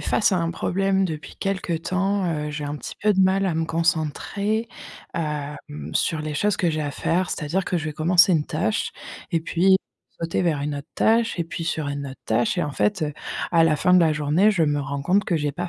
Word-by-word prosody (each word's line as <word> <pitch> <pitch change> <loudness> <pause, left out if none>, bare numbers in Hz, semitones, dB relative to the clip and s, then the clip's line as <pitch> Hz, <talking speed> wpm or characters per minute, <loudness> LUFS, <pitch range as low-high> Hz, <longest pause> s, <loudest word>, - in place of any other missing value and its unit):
face 210 - +2
à - - +3
un 165 0 0
problème 195 +2 +1
depuis 160 -4 -5
quelque 190 -3 -2
temps. 195 +4 0
Heu, 150 -3 -2
j'ai 150 0 -4
un 145 +1 -3
petit - - -7
peu 210 0 +4
de 190 - +2
mal 190 +1 +3
à 175 - 0
me 165 0 0
concentrer, 170 +7 -1 0.5
hem, 150 -3 -3 0.4
sur 160 - +1
les 155 0 -4
choses 205 +7 +1
que 175 - +1
j'ai 155 0 -2
à 145 -1 -2
faire. 175 +5 0
C'est-à-dire 165 +5 -1
que 180 - -1
je 160 - -5
vais 155 - -3
commencer 175 +4 +5
une 155 -3 +1
tâche 215 +8 -1 0.4
et 165 -3 +1
puis 180 +3 +3 0.4
sauter 165 +2 -1
vers 160 -5 +1
une 145 0 -2
autre 140 +1 -7
tâche, 230 -2 +2
et 170 - 0
puis 165 0 -6
sur 160 -2 -2
une 140 0 -4
autre 130 - -10
tâche, 115 +1 +1
et - - +2
en 145 - -4
fait, 195 +4 0
heu, 150 -1 -1 0.4
à 165 -1 +5
la 160 -2 +4
fin 180 +4 +3
de 180 - +7
la 160 -2 +4
journée, 150 +7 +3
je 180 -6 +2
me 145 -1 +1
rends 140 0 -4
compte 190 +8 +2
que 175 - 0
j'ai 145 -2 -1
pas 175 +4 -4
165 Hz, 235 wpm, -23 LUFS, 150-190 Hz, 0.5 s, de